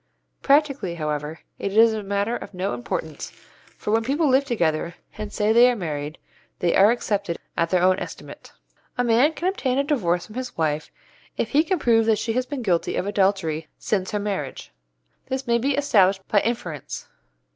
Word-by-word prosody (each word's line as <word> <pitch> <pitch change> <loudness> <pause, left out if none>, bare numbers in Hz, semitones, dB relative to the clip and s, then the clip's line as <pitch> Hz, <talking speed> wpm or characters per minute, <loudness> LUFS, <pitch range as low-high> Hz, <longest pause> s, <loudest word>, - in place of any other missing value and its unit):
Practically, 275 - +2
however, 150 0 -3 0.2
it 200 +1 -2
is 225 0 +7
a 215 - -3
matter 200 +3 -1
of 205 - -8
no 185 +2 -2
importance, 180 -10 -5 0.5
for 210 - -3
when 225 +1 +2
people 290 +6 +1
live 270 +1 +3
together 170 - 0 0.2
and 210 -1 -6
say 210 +1 +1
they 240 +2 +7
are 250 - +1
married, 155 -5 -4 0.4
they 175 -1 +1
are 200 +2 +7
accepted 205 -6 -1 0.2
at 170 - +1
their 180 0 +2
own 185 0 +4
estimate. - - -9 0.5
A 245 - +2
man 245 +6 +4
can 345 - -2
obtain 270 -9 0
a 280 - +3
divorce 180 - 0
from 215 - -13
his 255 +1 -6
wife 155 -2 -1 0.5
if - - -1
he 295 +2 +4
can 370 +3 0
prove 225 -6 +3
that 220 -1 +4
she 225 +2 -2
has 255 +2 -1
been 280 -3 -4
guilty 175 -5 0
of - - -1
adultery 190 -6 0
since 190 -3 -1
her 210 - -1
marriage. 195 - -4 0.6
This 265 +1 -3
may 235 -1 +2
be 275 +3 0
established 195 -9 +3
by 205 - +3
inference. 180 - -4
210 Hz, 190 wpm, -23 LUFS, 175-245 Hz, 0.6 s, is